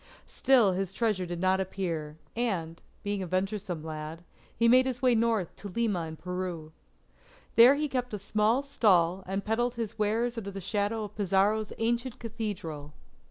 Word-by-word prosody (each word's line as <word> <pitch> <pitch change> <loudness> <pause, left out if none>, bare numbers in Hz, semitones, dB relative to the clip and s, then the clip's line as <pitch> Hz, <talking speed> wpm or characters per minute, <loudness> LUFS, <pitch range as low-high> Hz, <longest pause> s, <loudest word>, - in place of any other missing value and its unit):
Still 245 -7 +4
his 190 0 -2
treasure 210 -6 0
did 175 0 -4
not 185 +1 +2
appear, 170 -5 -3 0.2
and, 180 -9 -2 0.2
being 205 -1 -2
a 185 - -4
venturesome 185 -2 -2
lad, 155 +1 -6 0.3
he 230 - +4
made 255 +2 +6
his 250 -2 -2
way 250 -1 +5
north 225 -5 +1
to 205 - -7
Lima 200 -4 -1
in 160 - -7
Peru. 175 -2 -5 0.8
There 245 +4 +8
he 300 +1 0
kept 250 -3 -2
a - - -3
small 215 +6 +1
stall 190 -9 +3
and 195 +1 -3
peddled 240 +3 0
his 230 -1 -5
wares 230 +3 0
under 200 -3 -6
the 195 0 -6
shadow 205 +3 -1
of 210 -1 -8
Pizarro's 205 +2 +1
ancient 235 +2 -1
Cathedral. 200 - -5
205 Hz, 165 wpm, -29 LUFS, 180-230 Hz, 0.8 s, There